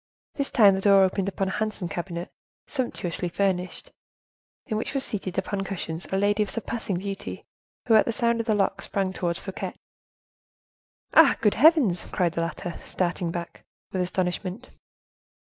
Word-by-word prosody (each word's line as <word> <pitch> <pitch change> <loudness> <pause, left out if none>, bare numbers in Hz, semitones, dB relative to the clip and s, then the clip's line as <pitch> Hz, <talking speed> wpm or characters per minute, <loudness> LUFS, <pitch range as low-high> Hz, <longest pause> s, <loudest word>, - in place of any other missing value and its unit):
This 280 -1 -2
time 205 -6 +6
the 190 - -1
door 195 -1 +6
opened 190 +1 +1
upon 195 0 -2
a 190 - -3
handsome 215 -4 -1
cabinet, 175 +1 -5 0.3
sumptuously 185 - -3
furnished, 185 -1 -1 0.7
in 220 - -3
which 220 +6 -3
was 270 - +2
seated 195 -4 -4
upon 195 +1 -1
cushions 175 -3 -5
a 190 - +1
lady 205 +2 +2
of 210 - 0
surpassing 225 -4 -3
beauty, 195 +1 -5 0.4
who 235 - +3
at 215 - +6
the - - 0
sound 235 0 +1
of 230 - -2
the 215 - +3
lock 195 -1 +1
sprang 195 -1 -1
towards 170 -2 -1
Fouquet. 195 - -6 1.4
"Ah! - - +7
good 210 - +4
heavens!" 270 - +5
cried 180 -3 +1
the 165 - -1
latter, 170 +1 -4
starting 175 -1 -1
back 170 0 -6 0.3
with 185 - -1
astonishment. 185 +5 -2
195 Hz, 165 wpm, -26 LUFS, 180-215 Hz, 1.4 s, Ah